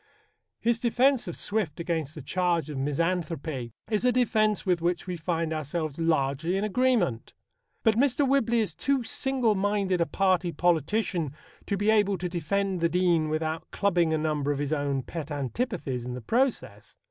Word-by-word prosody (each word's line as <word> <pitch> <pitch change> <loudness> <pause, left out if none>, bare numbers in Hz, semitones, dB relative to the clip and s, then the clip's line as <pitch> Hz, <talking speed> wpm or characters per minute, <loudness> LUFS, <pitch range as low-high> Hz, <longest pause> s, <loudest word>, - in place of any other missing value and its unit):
His 230 0 +1
defence 250 +2 +2
of - - -4
Swift 200 -8 -2
against 160 -3 -2
the 150 - -8
charge 170 -1 0
of 145 - -5
misanthropy 155 -3 -2 0.2
is 215 0 0
a 250 - +4
defence 215 -4 +2
with 180 -3 +1
which 175 0 0
we 180 -1 -3
find 165 -1 -2
ourselves 155 0 -3
largely 160 +2 +1
in 195 - -1
agreement. 215 - +1 0.5
But 220 -1 +3
Mr. 275 +2 +3
Whibley 235 -4 +2
is 215 - -2
too 275 -2 0
single 255 -2 +1
minded 200 -2 0
a 170 - +2
party 185 -2 +1
politician 170 -2 0 0.3
to 200 - 0
be 205 +2 +2
able 205 -3 +3
to 180 +1 -3
defend 185 +2 -1
the 170 - +3
Dean 175 -3 +2
without 155 +1 -2
clubbing 175 -5 +1
a 160 - +2
number 150 -2 0
of 145 - -1
his 145 +1 -1
own 140 -3 -1
pet 160 0 -6
antipathies 145 - -3
in 125 0 -5
the 125 - -6
process. 245 - -1
175 Hz, 170 wpm, -27 LUFS, 155-215 Hz, 0.5 s, a